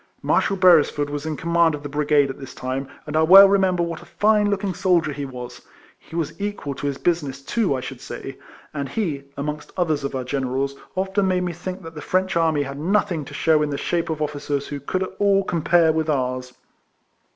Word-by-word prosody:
Marshal 195 - +2
Beresford 155 -5 +4
was 145 +1 -4
in 155 -2 -3
command 170 -1 +2
of 145 - -10
the - - -4
brigade 145 -1 +2
at 135 - -11
this 135 - -10
time; 130 +1 -3 0.2
and 150 - -5
I 155 - +4
well 190 +5 +9
remember 190 -3 +2
what 170 -1 -4
a - - -6
line 210 -1 +4
looking 200 -1 -1
soldier 170 -4 +1
he 145 0 -4
was. 125 -2 -8 0.4
He 165 - -13
was 165 +2 -3
equal 205 -9 -3
to 140 +1 -4
his 140 -1 -2
business, 145 -6 -1
too, 205 -4 0
I 130 - -3
should - - -8
say; - - -8 0.3
and 140 -2 -4
he, 155 -11 -2
amongst 150 +1 -4
others 160 -5 0
of 140 - -3
our 130 - -2
generals, 135 +1 -2 0.2
often 190 +1 0
made 180 -1 +1
me 175 -1 -2
think 185 +3 -6
that 165 0 -9
the 150 - -8
French 185 +2 0
army 160 -3 +2
had 140 0 -7
nothing 180 -2 0
to - - -10
shew 155 -2 +3
in 150 - 0
the 140 - -3
shape 170 +2 -1
of 155 -1 -1
officers 145 -1 -3
who 145 - -4
could 185 +7 -2
at 190 - -6
all 200 -1 +3
compare 170 -2 +3
with 160 0 -1
ours. 130 -3 -1
155 Hz, 220 wpm, -22 LUFS, 140-185 Hz, 0.4 s, well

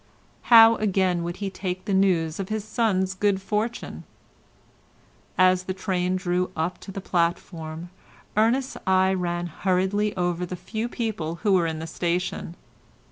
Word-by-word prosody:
How, 225 -1 +9
again, 190 -4 +1
would 175 +1 -4
he 200 -1 -4
take 185 -1 -4
the 200 - -1
news 175 -4 +2
of 195 - -4
his 215 -1 -2
son's 200 -4 0
good 195 0 +1
fortune? 215 +4 -3 1.3
As 185 0 +4
the 185 - -3
train 185 -1 -1
drew 180 -1 0
up 160 +3 -2
to 195 - -9
the 195 - -5
platform, 170 -2 -2 0.4
Ernest's 245 +5 +1
eye 190 0 +4
ran 175 -2 -2
hurriedly 190 +4 0
over 175 -1 -1
the 180 +1 -4
few 220 +6 -4
people 215 -10 -3
who 205 -3 +3
were 175 -3 +3
in 160 -1 -3
the 160 - -5
station. 170 +1 -2
185 Hz, 150 wpm, -25 LUFS, 175-205 Hz, 1.3 s, How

